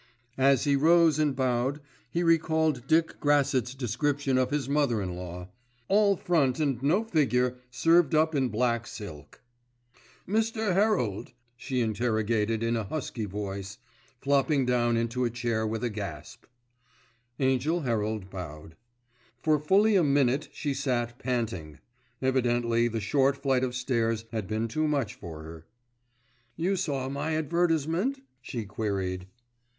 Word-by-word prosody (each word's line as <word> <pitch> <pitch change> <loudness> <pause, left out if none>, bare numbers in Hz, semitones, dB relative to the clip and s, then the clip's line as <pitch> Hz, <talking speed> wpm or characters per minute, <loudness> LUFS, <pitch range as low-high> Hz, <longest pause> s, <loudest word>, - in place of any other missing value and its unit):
As 135 -1 +4
he 140 -1 +3
rose 160 +1 +4
and 150 -3 +1
bowed 130 +2 0 0.3
he 175 - -1
recalled 160 -5 +2
Dick 160 +1 +2
Grassetts' 140 -4 +2
description 135 +3 -1
of 130 0 +2
his 145 -3 -1
mother 140 -5 +1
in 90 -3 -4
law, 90 0 -7 0.4
"All 200 -1 +4
front 150 -8 +1
and 140 -6 0
no 165 +10 +2
figure 125 - +1
served 165 +4 +3
up 160 +1 +3
in 135 -4 +1
black 120 +1 0
silk." 75 -9 -10 0.9
"Mr. 220 0 0
Herald?" 130 - 0 0.2
she 130 0 -2
interrogated 110 -1 0
in 115 +1 +1
a 110 -2 -2
husky 125 -3 -4
voice, 100 -1 -5 0.4
flopping 140 0 +2
down 120 -1 +2
into 115 +2 -1
a 120 - +1
chair 115 -2 -1
with 110 +1 -3
a 120 - +1
gasp. 100 -8 -7 0.9
Angell 135 +6 +1
Herald 110 -6 -2
bowed. 80 -3 -8 0.7
For 155 -1 +3
fully 200 +8 +3
a 185 - +5
minute 140 -1 +2
she 145 -2 -3
sat 120 -3 -2
panting. 110 - -3 0.5
Evidently 120 -2 +2
the 115 -1 -2
short 135 +6 +2
flight 135 -2 +1
of 125 -1 -2
stairs 115 -3 0
had 110 -5 -3
been 110 +1 -1
too 155 +7 -1
much 140 -8 -1
for 80 -2 -9
her. 80 0 -11 0.9
"You 180 +4 0
saw 145 -8 -2
my 145 +4 -2
advertisement?" 170 - 0 0.2
she 120 -3 -5
queried. 95 -3 -3
130 Hz, 140 wpm, -28 LUFS, 110-150 Hz, 0.9 s, a